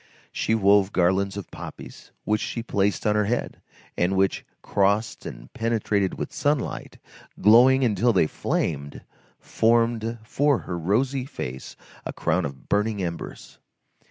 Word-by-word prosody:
She 110 - 0
wove 100 -2 +4
garlands 95 +2 +1
of 100 - -7
poppies, - - -10
which 105 0 0
she 115 - -4
placed 100 -3 0
on 105 - +3
her 105 0 +2
head, 120 +4 -2 0.3
and 90 +2 +1
which, 95 0 +1 0.2
crossed 100 +2 0
and - - -10
penetrated 110 -4 0
with - - -5
sunlight, 145 -2 -2 0.4
glowing 125 +6 +6
until 120 +1 +2
they 95 -7 +3
flamed, 70 -1 -3 0.4
formed 115 0 +1
for 140 +5 +2
her 90 - -5
rosy 125 - 0
face 65 - -7 0.3
a - - -5
crown - - 0
of 70 -3 -8
burning 105 -1 0
embers. 85 -1 -7
105 Hz, 135 wpm, -24 LUFS, 95-115 Hz, 0.4 s, glowing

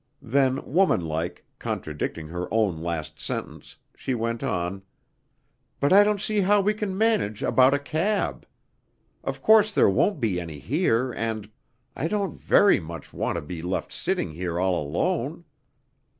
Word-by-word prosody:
Then, 135 +1 +1
womanlike, 90 - 0
contradicting 75 +1 -4
her 90 +2 -5
own 105 -8 +1
last 85 -2 -4
sentence, - - -5 0.2
she 130 - -3
went 115 0 -2
on, 95 -5 -2 1.0
"But 140 +5 +3
I 200 +1 +9
don't 210 0 +1
see 215 +1 0
how 205 +2 +4
we 205 +2 +2
can 210 -3 -3
manage 215 - +1
about 130 +3 +5
a - - +2
cab. 160 +9 -1 0.8
Of - - -5
course 215 -1 +6
there 105 - +4
won't 165 - +2
be 105 -8 0
any 80 -3 -7
here, 130 - +1
and 110 -3 -3 0.4
I 160 - -1
don't 200 +1 -2
very 205 - +5
much 85 -2 -9
want - - -2
to 85 - -3
be 80 +2 -6
left 90 +2 -3
sitting 185 - -1
here 85 +1 -3
all 90 -2 +1
alone." 75 0 -2
115 Hz, 150 wpm, -25 LUFS, -, 1.0 s, I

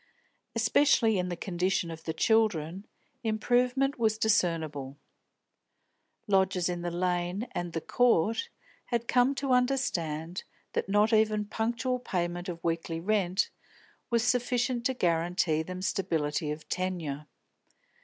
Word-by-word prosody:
Especially 225 -2 +3
in 180 0 -1
the 175 - -2
condition 180 -1 -1
of 160 0 -9
the 160 - -1
children 195 -2 +1 0.4
improvement 250 +5 +1
was 220 -2 +2
discernible. 160 -10 0 1.3
Lodgers 190 -3 +2
in 175 -1 -3
the 175 - -2
Lane 180 +4 -1
and 175 -1 -4
the 165 - -2
Court 230 - +2 0.4
had 235 -1 -2
come 250 +2 +3
to 275 -1 -2
understand 180 - 0 0.3
that - - -1
not 210 +3 +3
even 215 -1 +3
punctual 235 +4 -1
payment 175 -4 -3
of 170 -1 -6
weekly 165 0 -2
rent 190 0 +1 0.6
was 235 -1 +2
sufficient 245 0 +1
to 260 - -2
guarantee 170 -3 +1
them 185 +3 -6
stability 160 -6 -1
of 150 +1 -5
tenure. 165 -6 -3
190 Hz, 125 wpm, -29 LUFS, 170-230 Hz, 1.3 s, Especially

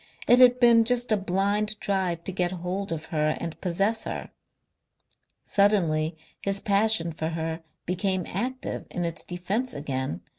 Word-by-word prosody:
It 245 - +6
had 250 0 +7
been 235 -2 +6
just 245 0 +1
a - - +5
blind 205 +2 0
drive 185 -4 -1
to 190 - -2
get 180 -1 0
hold 185 +2 -4
of 160 -1 -4
her 155 0 +1
and 165 -1 -6
possess 195 +5 0
her.... - - -5 1.1
Suddenly 170 -6 +2 0.2
his 195 0 0
passion 200 -5 +2
for 160 0 -3
her 160 0 -3 0.2
became 185 0 0
active 255 +7 -4
in 175 - -3
its 170 -1 -1
defence 195 +8 -3
again. 130 - -3
190 Hz, 150 wpm, -26 LUFS, 165-215 Hz, 1.1 s, had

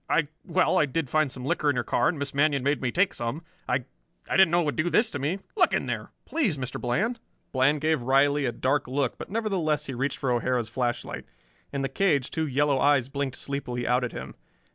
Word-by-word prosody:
I 150 -3 +2
well, 185 0 +2
I 150 - +3
did 145 0 -2
find 155 -3 +2
some 125 -1 -7
liquor 145 +1 +1
in 145 - +2
your 120 - 0
car, - - +2
and 160 - -2
Miss 140 -1 -4
Manion 140 -1 +2
made 140 -1 +1
me 125 -2 0
take 185 +6 +2
some. 120 +8 -4 0.3
I 125 0 0 0.4
I - - -1
didn't 190 -3 +7
know 175 +1 +3
it - - -1
would 145 - -1
do 155 +2 +1
this 220 +5 +3
to 145 - -4
me. 150 +8 -1 0.2
Look 370 -5 +3
in - - +1
there; - - -4 0.2
please, 240 - 0
Mr. 130 -2 -5
Bland!" 215 - 0 0.3
Bland 140 +3 +2
gave 155 -3 +1
Riley 140 +3 +3
a 120 - +1
dark 130 +4 0
look, 135 -1 -1
but - - -7
nevertheless 185 -9 0
he 135 - -5
reached 130 +3 -1
for 135 - -1
O'Hara's 120 -1 0
flashlight. 120 0 -3 0.5
In 140 -1 -2
the - - +1
cage 145 -7 +1
two 160 -1 -1
yellow 140 0 +2
eyes 140 -3 +3
blinked 140 -2 -3
sleepily 125 -4 -4
out 125 +1 +2
at 125 - -2
him. - - -7
140 Hz, 230 wpm, -27 LUFS, 130-155 Hz, 0.5 s, didn't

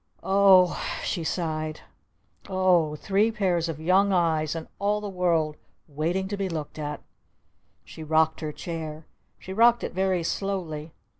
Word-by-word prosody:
"O 190 -2 +5
h," - - -4
she 170 - -2
sighed. 155 -2 -3 0.7
"O 180 -5 +2
h! - - -12
Three 205 +3 +2
pairs 180 -6 0
of 155 -2 -5
Young 190 +5 +3
Eyes 160 -4 +1
and 165 - -6
all 205 +1 +1
the 210 - -5
World 170 -5 0 0.3
waiting 165 +6 -2
to 205 - -2
be 195 -1 -2
looked 155 -2 -5
at!" 150 -1 -5 0.8
She 160 - -10
rocked 160 +1 +2
her 155 -1 -3
chair. 160 -1 -6 0.3
She 190 - -8
rocked 235 +3 +4
it - - -4
very 185 -1 0
slowly. 165 -5 -3
170 Hz, 155 wpm, -26 LUFS, 155-190 Hz, 0.8 s, O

